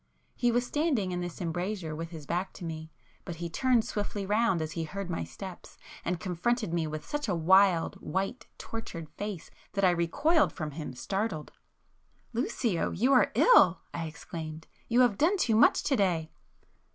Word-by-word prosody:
He 245 -1 +2
was 245 +1 +1
standing 270 - 0
in 180 0 -2
this 175 -1 -5
embrasure 175 -1 -3
with 165 +1 -5
his 160 -4 -9
back 180 +5 -2
to 175 - -8
me, 160 -1 -6 0.3
but 175 - -6
he 170 0 -5
turned 250 +2 +2
swiftly 205 -1 -3
round 210 -2 +2
as 155 -1 -3
he 165 - -3
heard 185 +3 -5
my 165 - -2
steps 190 -3 -9 0.3
and 175 0 -1
confronted 190 +3 -1
me 165 -2 0
with 155 0 -5
such 295 0 -3
a - - +1
wild, 180 +1 +4
white, 195 +6 -3
tortured 180 -8 -6
face 205 -5 -6 0.2
that 195 - -1
I 180 - +6
recoiled 285 - +2
from 155 -5 -4
him, 150 -2 -6
startled. 195 - -3 0.8
"Lucio, 230 -5 0
you 250 +9 +2
are 255 - +5
ill!" 400 - +6
I 165 -1 -3
exclaimed—"you 160 +8 -3
have 240 -6 +3
done 355 +7 +4
too 230 - +2
much 225 - +5
to 275 - +2
day." 170 -7 +1
185 Hz, 175 wpm, -29 LUFS, 165-230 Hz, 0.8 s, I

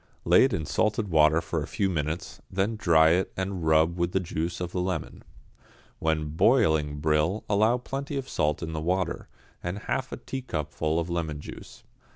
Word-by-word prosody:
Lay 90 +8 +6
it 135 - 0
in 80 -7 -2
salted 105 +5 0
water 80 0 +4
for - - -3
a - - -5
few 100 - 0
minutes, 80 -2 -3
then 100 +4 0
dry 85 -6 +5
it 90 +3 +1
and 95 -2 -3
rub 80 +2 +3
with 85 0 0
the 95 - +3
juice 85 -1 -3
of 90 -1 -4
a 90 - -1
lemon. 90 -3 -3 0.8
When 80 -1 0
boiling 80 - +3
brill 75 +6 +1
allow 110 +4 +3
plenty 140 +3 -5
of 135 -1 -4
salt 75 - 0
in 80 0 -4
the 80 - -3
water, 90 +3 -1 0.3
and 90 +3 -4
half 130 +5 -3
a - - -5
teacupful 80 - -3
of 85 +1 -3
lemon 80 -4 -2
juice. - - -11
85 Hz, 185 wpm, -27 LUFS, 80-100 Hz, 0.8 s, Lay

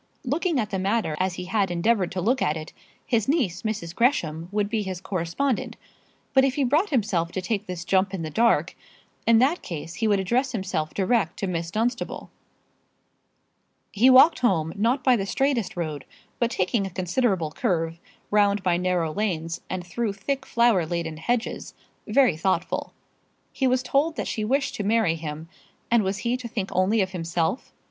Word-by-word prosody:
Looking 305 +3 0
at 215 -2 -2
the 190 - -1
matter 195 -4 0
as 185 -1 0
he 180 - -6
had 195 0 0
endeavoured 185 +2 +1
to 185 - -2
look 245 +8 +1
at 150 +2 +1
it, 155 0 -8 0.3
his 225 -4 +1
niece, 235 - +1
Mrs. 210 -7 -3
Gresham, 170 - 0
would 205 0 0
be 215 +1 -1
his 190 -3 -4
correspondent; 190 +7 -2 0.6
but 265 -1 +6
if 270 -1 +1
he 285 - +1
brought 300 +10 +2
himself 200 - 0
to - - -2
take 205 +2 -2
this 175 -2 -5
jump 190 +1 +2
in 190 -4 -4
the 155 - -5
dark, 230 +8 +2 0.5
in 230 -1 +6
that 275 +9 +3
case 165 0 -6
he 225 - -1
would 205 -2 +3
address 250 +7 0
himself 190 -7 -3
direct 200 -2 +1
to - - -2
Miss 170 -2 -3
Dunstable. 235 +6 -2 1.6
He 235 +6 +4
walked 260 +6 +7
home, 165 -10 +1
not 235 +6 +1
by 255 -1 +5
the 195 -3 -2
straightest 265 -6 0
road, 155 -5 -4 0.3
but 235 - +2
taking 195 0 0
a - - -6
considerable 185 -2 0
curve, 165 0 -1 0.3
round 205 -1 +3
by 175 -2 +2
narrow 180 -3 0
lanes, 170 -5 -2
and 180 -1 -4
through 210 +4 -2
thick 270 +7 -3
flower 235 -6 +3
laden 160 -1 -3
hedges, 240 +8 -2 0.3
very 245 - +4
thoughtful. 185 +4 -1 0.6
He 265 - +1
was 255 0 +2
told 295 +5 +1
that - - -3
she 215 - -2
wished 275 +6 0
to 210 - -2
marry 215 -4 +2
him; 160 -1 -6 0.4
and 235 -1 +5
was 195 0 -1
he 240 +1 +1
to 250 -2 -7
think 210 -4 -4
only 195 +4 +2
of 190 0 -1
himself? 170 +4 -2
200 Hz, 185 wpm, -25 LUFS, 175-240 Hz, 1.6 s, walked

